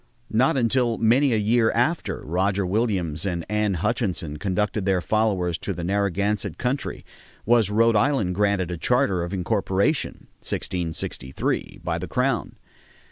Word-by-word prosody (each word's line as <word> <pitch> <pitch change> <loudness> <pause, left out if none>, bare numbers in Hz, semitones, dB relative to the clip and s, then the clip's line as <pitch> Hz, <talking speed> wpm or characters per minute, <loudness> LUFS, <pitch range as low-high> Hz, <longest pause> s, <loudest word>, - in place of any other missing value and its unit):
Not 130 +5 +3
until 120 -1 +2
many 125 +5 +3
a 115 - +2
year 110 +2 +3
after 155 +8 0
Roger 95 +4 0
Williams 90 -6 -1
and 85 -4 -2
Anne 105 -1 0
Hutchinson 90 -6 -2
conducted 100 +5 -1
their 95 -2 +3
followers 95 -4 0
to - - -3
the 85 - -5
Narragansett 100 +2 0
country 130 +3 -3 0.4
was 115 -3 +4
Rhode 115 +2 +3
Island 110 -5 +2
granted 100 -2 +1
a 90 - -3
charter 125 -5 +2
of 85 +1 -4
incorporation 100 - 0
(1663) 80 -6 -3
by 85 -1 -1
the 90 - -5
crown. 125 -4 -1
100 Hz, 135 wpm, -24 LUFS, 90-115 Hz, 0.4 s, was